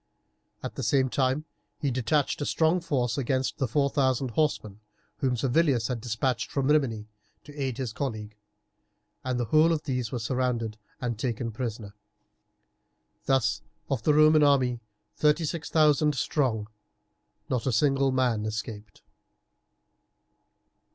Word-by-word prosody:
At - - -4
the - - -5
same 130 -2 +2
time 135 +3 0 0.3
he 140 - -1
detached 135 +4 0
a - - -1
strong 165 +3 +2
force 125 -6 -1
against 130 0 -1
the 130 - +1
four 140 +4 +2
thousand 130 -2 0
horsemen, 110 -8 -1 0.4
whom 125 +2 0
Servilius 130 -2 +2
had 120 -3 -3
despatched 120 +2 -1
from 140 0 -1
Rimini 115 -8 +1 0.4
to 145 - -13
aid 135 -4 -3
his 125 -5 -4
colleague, 110 -6 -4 0.9
and 125 -1 -2
the 120 - 0
whole 155 +8 +4
of 160 -2 -1
these 125 -6 -2
were 125 - -2
surrounded 115 -2 -2 0.2
and 120 -3 -3
taken 115 -1 -2
prisoners. 110 -3 -5 1.3
Thus 130 -5 +2 0.3
of 130 -5 0
the 150 +5 +3
Roman 155 0 +6
army, 130 -4 +3 0.4
thirty 150 +2 +3
six 160 +1 -4
thousand 150 -1 +3
strong, 120 -5 0 0.8
not 130 -4 -2
a - - +2
single 135 +3 +2
man 125 -5 +1
escaped. 105 -2 -6
130 Hz, 140 wpm, -27 LUFS, 115-145 Hz, 1.3 s, Roman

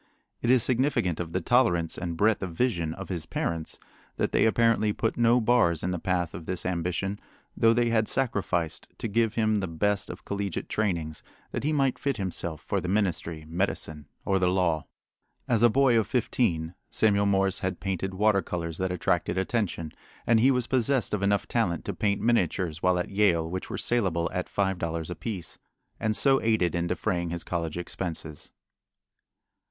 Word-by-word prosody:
It 120 - 0
is 125 -2 +6
significant 125 - +1
of 85 -2 -4
the 95 - -1
tolerance 85 -6 +2
and 85 -2 -4
breadth 110 +2 +3
of 90 -4 -5
vision 85 -9 0
of 95 0 -8
his 85 -4 -4
parents 80 -2 -3 0.4
that - - 0
they - - +4
apparently 110 -2 +3
put 115 - -1
no 120 +1 +4
bars 110 -9 +2
in 90 - 0
the 90 - -2
path 90 -1 -1
of 80 - -8
this 90 -1 -3
ambition, 90 +3 -2 0.4
though 115 - +4
they 120 0 +2
had 110 -2 +2
sacrificed 95 -10 -1
to - - -3
give 115 +1 +1
him 110 -2 +2
the 95 - -2
best 100 +5 -1
of - - -9
collegiate 100 -3 -3
trainings 85 -8 -1 0.3
that - - -3
he 150 - +1
might 135 -3 +1
fit 140 -4 -1
himself 85 -4 -3
for - - -2
the - - -4
ministry, 90 -5 -1
medicine, 80 -3 -2 0.2
or 95 -1 +2
the 90 - +2
law. 90 -4 +1 0.6
As 115 -3 +2
a 120 - +7
boy 130 -1 +4
of 110 - -1
fifteen 90 -9 0 0.2
Samuel 100 -2 +3
Morse 95 -1 +2
had 95 -2 -3
painted 95 0 -3
water 105 0 +3
colors 85 -3 -4
that 95 0 0
attracted 90 0 0
attention, 95 -5 -1 0.3
and 115 -1 +4
he 125 +4 +5
was 125 -3 +2
possessed 130 -1 +1
of 105 - 0
enough 100 0 +1
talent 90 -9 0
to - - -2
paint 100 -1 0
miniatures 90 -7 0
while 90 0 +3
at 90 - -2
Yale 95 -5 +2
which 90 +2 -5
were - - -4
salable 90 -9 0
at - - -3
five 95 -2 0
dollars 85 0 -3
apiece, 95 -2 -5 0.4
and 110 -1 0
so 135 -1 +4
aided 110 -7 +2
in 85 0 -1
defraying 85 -1 -1
his 85 0 -4
college 85 -2 -3
expenses. 85 -3 -5
95 Hz, 185 wpm, -27 LUFS, 85-110 Hz, 0.6 s, a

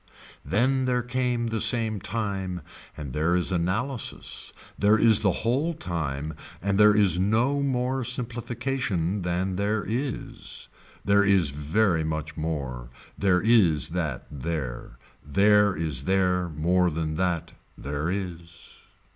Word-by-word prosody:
Then 130 +4 +2
there 125 -1 +1
came 125 -1 -1
the 115 -1 -1
same 110 -4 +2
time 95 -4 -3 0.4
and 70 -4 -6
there 80 +4 +1
is 90 +1 0
analysis, 100 +9 -2 0.2
there 105 +2 +4
is 110 -1 +5
the 100 - +2
whole 145 +8 +1
time 80 - -3 0.3
and 100 +2 0
there 105 0 +7
is 95 -5 +4
no 115 +9 +2
more 130 -1 0
simplification 120 -5 -2
than 90 +1 -1
there 105 +1 0
is. 125 +4 -5 0.4
There 100 0 +4
is 95 -7 +3
very 80 +4 +1
much 80 -1 -3
more. 70 -7 -4 0.3
There 95 -3 +2
is 95 - +4
that 80 -7 -3
there. 75 -3 -5 0.3
There 100 +6 +4
is 75 -5 -3
there 90 -2 +1
more 90 +4 +2
than 80 -1 -3
that. 90 -2 -1 0.3
There 70 +3 -3
is. 85 -3 -6
95 Hz, 130 wpm, -26 LUFS, 80-115 Hz, 0.4 s, there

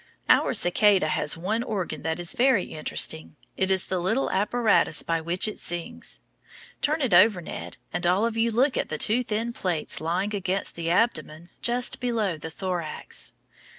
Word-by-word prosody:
Our - - +4
cicada 190 -1 +3
has 150 +1 0
one 205 +7 -1
organ 190 - -3
that 160 +2 -2
is 175 -1 -1
very 245 -6 +3
interesting; 80 - 0 0.2
it 190 - 0
is 190 -1 +2
the 185 - -2
little 220 +10 0
apparatus 210 -5 +2
by 165 -1 -1
which 175 +5 +2
it 215 - -5
sings. 230 +8 -4 0.6
Turn 305 +1 +1
it 240 -7 0
over, 185 +2 +6
Ned, 170 - -7 0.2
and 175 +1 -1
all 190 +5 +3
of 230 -1 -2
you 225 +1 +2
look 255 +4 +1
at - - -1
the 155 - -3
two 230 +10 +3
thin 230 +1 -2
plates 175 -9 -2
lying 180 +6 -1
against 195 -1 -2
the 165 0 -4
abdomen 170 -4 0
just 245 +1 +1
below 225 -7 -1
the 160 - -6
thorax. 175 -2 -4
190 Hz, 175 wpm, -25 LUFS, 170-230 Hz, 0.6 s, over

